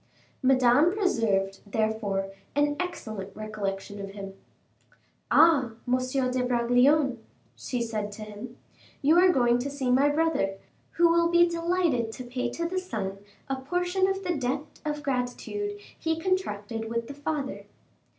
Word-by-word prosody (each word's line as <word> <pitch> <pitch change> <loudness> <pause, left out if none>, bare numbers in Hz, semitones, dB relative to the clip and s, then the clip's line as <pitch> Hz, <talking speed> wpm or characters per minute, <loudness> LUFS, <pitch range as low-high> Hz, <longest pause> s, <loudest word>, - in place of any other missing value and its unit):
Madame 260 +4 +5
preserved 205 - +1
therefore 205 -2 -1 0.2
an 290 0 +2
excellent 215 - -5
recollection 205 -2 -4
of 195 - -6
him. 195 -1 -7 1.0
"Ah! 295 -7 +5
M. 250 +1 +3 0.3
de 255 0 0
Bragelonne," 250 +2 +3 0.4
she 245 -2 -3
said 215 -2 -3
to 215 +1 -8
him, 215 +3 -9 0.5
"you 315 +5 +6
are 370 +1 +6
going 240 -6 +3
to 265 +3 -2
see 275 -3 -1
my 275 +3 +4
brother, 290 -10 +1 0.4
who 345 - +5
will 335 0 +4
be 345 0 +5
delighted 335 -8 0
to 255 - -7
pay 250 0 -3
to 335 +7 -3
the 370 +2 -1
son 200 - -4 0.3
a 270 - -1
portion 355 +7 0
of 385 0 -2
the 355 -2 0
debt 275 +2 -3
of 295 -1 -3
gratitude 280 +11 -2 0.2
he 320 0 -1
contracted 225 - -2
with 230 0 -2
the 280 - -7
father." 285 -1 -4
255 Hz, 145 wpm, -27 LUFS, 220-325 Hz, 1.0 s, you